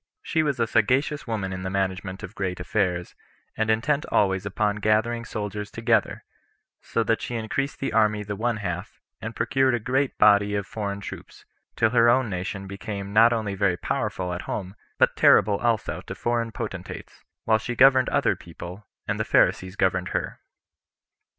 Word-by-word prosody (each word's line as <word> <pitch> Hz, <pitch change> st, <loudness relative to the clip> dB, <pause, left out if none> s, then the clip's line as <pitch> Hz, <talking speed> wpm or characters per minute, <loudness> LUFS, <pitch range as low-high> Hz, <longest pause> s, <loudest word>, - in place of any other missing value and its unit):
She 160 Hz, -, +1 dB
was 145 Hz, -5 st, -1 dB
a 115 Hz, -, +3 dB
sagacious 130 Hz, +7 st, +1 dB
woman 105 Hz, -4 st, -2 dB
in 95 Hz, -, -5 dB
the 95 Hz, -, -3 dB
management 95 Hz, 0 st, -2 dB
of 105 Hz, -, -7 dB
great 95 Hz, -3 st, -3 dB
affairs, 90 Hz, -2 st, -1 dB, 0.4 s
and 110 Hz, 0 st, -1 dB
intent 140 Hz, +7 st, +1 dB
always 95 Hz, -1 st, +2 dB
upon 105 Hz, +1 st, 0 dB
gathering 110 Hz, +3 st, +1 dB
soldiers 105 Hz, -2 st, -5 dB
together; 115 Hz, -2 st, 0 dB, 0.6 s
so 115 Hz, -, -1 dB
that 115 Hz, 0 st, 0 dB
she 120 Hz, -, -4 dB
increased 115 Hz, +5 st, -2 dB
the 135 Hz, -, -2 dB
army 105 Hz, -1 st, +2 dB
the 105 Hz, 0 st, -5 dB
one 115 Hz, +2 st, -1 dB
half, 90 Hz, -3 st, -5 dB, 0.2 s
and -, -, -6 dB
procured 130 Hz, -2 st, +2 dB
a -, -, -1 dB
great 130 Hz, +4 st, 0 dB
body 105 Hz, -1 st, +5 dB
of 100 Hz, -1 st, -1 dB
foreign 100 Hz, -2 st, -4 dB
troops, -, -, -10 dB, 0.3 s
till 115 Hz, -1 st, +2 dB
her 120 Hz, -1 st, +5 dB
own 120 Hz, -2 st, +2 dB
nation 95 Hz, +2 st, -4 dB
became 100 Hz, 0 st, -6 dB
not 115 Hz, +2 st, +6 dB
only 110 Hz, -4 st, -1 dB
very 95 Hz, -2 st, +1 dB
powerful 100 Hz, -8 st, -2 dB
at 90 Hz, -, -4 dB
home, 95 Hz, -2 st, -4 dB, 0.2 s
but -, -, +3 dB
terrible 100 Hz, +1 st, +5 dB
also 115 Hz, -1 st, -1 dB
to -, -, -5 dB
foreign 120 Hz, -1 st, -1 dB
potentates, -, -, -7 dB, 0.2 s
while 110 Hz, -1 st, +3 dB
she 120 Hz, +2 st, -4 dB
governed 130 Hz, 0 st, +6 dB
other -, -, +2 dB
people, 90 Hz, +4 st, -10 dB, 0.2 s
and -, -, -1 dB
the -, -, +1 dB
Pharisees 95 Hz, +1 st, +2 dB
governed 95 Hz, -2 st, +1 dB
her. -, -, -5 dB
105 Hz, 175 wpm, -25 LUFS, 95-115 Hz, 0.6 s, not